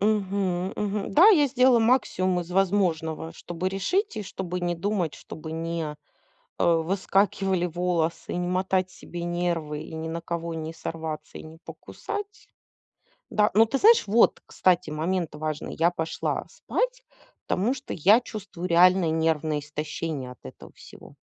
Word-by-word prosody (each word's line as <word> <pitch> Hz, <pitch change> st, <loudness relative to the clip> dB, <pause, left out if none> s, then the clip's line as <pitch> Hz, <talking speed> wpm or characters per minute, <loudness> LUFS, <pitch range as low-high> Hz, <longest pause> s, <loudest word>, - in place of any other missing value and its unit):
Мгм, 195 Hz, -3 st, 0 dB
мгм. 205 Hz, -1 st, -2 dB
Да, 360 Hz, +8 st, +8 dB
я 310 Hz, -9 st, +6 dB
сделала 255 Hz, -2 st, +4 dB
максимум 185 Hz, -6 st, +2 dB
из 175 Hz, 0 st, -8 dB
возможного, 175 Hz, -4 st, 0 dB
чтобы 175 Hz, +2 st, -4 dB
решить, 325 Hz, -, -1 dB
и 215 Hz, -, -3 dB
чтобы 180 Hz, -2 st, -5 dB
не 175 Hz, 0 st, -1 dB
думать, 175 Hz, -4 st, -1 dB
чтобы 160 Hz, +3 st, -9 dB
не, 165 Hz, -2 st, -3 dB, 0.6 s
э, -, -, +2 dB
выскакивали 190 Hz, +2 st, +1 dB
волосы, 170 Hz, -1 st, -1 dB
не 180 Hz, 0 st, -1 dB
мотать 185 Hz, 0 st, 0 dB
себе 175 Hz, -1 st, -8 dB
нервы 170 Hz, -3 st, -2 dB
и -, -, -10 dB
ни 160 Hz, 0 st, -4 dB
на 165 Hz, +1 st, -4 dB
кого 170 Hz, 0 st, -4 dB
не 160 Hz, 0 st, -5 dB
сорваться 160 Hz, -1 st, -6 dB
и -, -, -9 dB
не 160 Hz, +1 st, -12 dB
покусать. 415 Hz, 0 st, -7 dB, 0.9 s
Да. 210 Hz, 0 st, +3 dB
Но, 225 Hz, +2 st, +7 dB
ты 270 Hz, +5 st, -1 dB
знаешь, 455 Hz, +2 st, +6 dB
вот, 225 Hz, +4 st, +4 dB
кстати, 180 Hz, -3 st, +1 dB
момент 165 Hz, +2 st, -1 dB
важный- 155 Hz, 0 st, -4 dB
я 170 Hz, +1 st, +5 dB
пошла 160 Hz, -2 st, -3 dB
спать, -, -, -2 dB, 0.4 s
потому 215 Hz, +8 st, +1 dB
что 275 Hz, 0 st, -7 dB
я 205 Hz, +9 st, +5 dB
чувствую 200 Hz, -6 st, -7 dB
реально 180 Hz, 0 st, +5 dB
нервное 160 Hz, -1 st, 0 dB
истощение 150 Hz, -2 st, -5 dB
от -, -, -14 dB
этого 65 Hz, -, -11 dB
всего. -, -, -14 dB
180 Hz, 150 wpm, -26 LUFS, 160-205 Hz, 0.9 s, Да